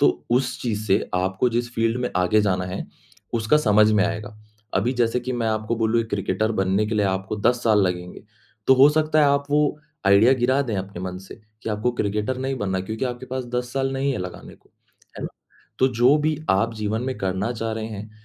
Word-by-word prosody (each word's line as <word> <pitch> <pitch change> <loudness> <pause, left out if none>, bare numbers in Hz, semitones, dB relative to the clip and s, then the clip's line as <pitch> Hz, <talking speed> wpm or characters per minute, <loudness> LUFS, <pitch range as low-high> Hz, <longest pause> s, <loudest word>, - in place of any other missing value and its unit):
तो 75 - +2
उस 125 +1 +1
चीज़ 110 -3 -2
से 100 +2 +2
आपको 95 +6 +1
जिस 120 +1 -2
फ़ील्ड 115 +1 +1
में 125 - -1
आगे 90 +4 +3
जाना 95 -3 0
है, 90 +1 -5 0.5
उसका 115 +6 +3
समझ 110 -6 +4
में 105 -1 +3
आएगा। 105 0 -4 0.4
अभी 125 - +1
जैसे 120 -1 +1
कि 130 +1 -4
मैं 120 -2 -1
आपको 110 +1 -1
बोलूँ 115 +1 +2
एक 115 - -5
क्रिकेटर 105 +2 0
बनने 95 +1 +1
के 110 - -2
लिए 105 -1 +2
आपको 95 +2 -2
10 120 +4 +1
साल 110 -3 +4
लगेंगे। 90 -1 -3 0.4
तो 130 - +7
हो 135 +2 +7
सकता 155 0 +1
है - - +6
आप 140 0 +2
वो 150 +1 +4 0.5
आइडिया 100 +6 +6
गिरा 130 +2 +2
दें 115 -6 -3
अपने 95 -1 -5
मन 90 0 -5
से, 95 +1 -12 0.2
कि - - -4
आपको 105 +4 0
क्रिकेटर 105 +3 -2
नहीं 135 +1 -2
बनना 95 -2 -1
क्योंकि 110 +6 -4
आपके 125 0 -4
पास 130 0 -4
10 125 0 -2
साल 135 0 -1
नहीं 135 +1 0
है - - -3
लगाने 90 0 -8
को, - - -28 0.5
हैं - - -6
ना? - - -3 0.5
तो 130 - +4
जो 125 +3 +4
भी 155 0 0
आप 115 +4 +1
जीवन 110 +1 -2
में 130 0 -3
करना 95 +4 -1
चाह 115 -1 -3
रहे 110 0 -4
हैं, 105 0 -7
110 Hz, 225 wpm, -23 LUFS, 100-125 Hz, 0.5 s, तो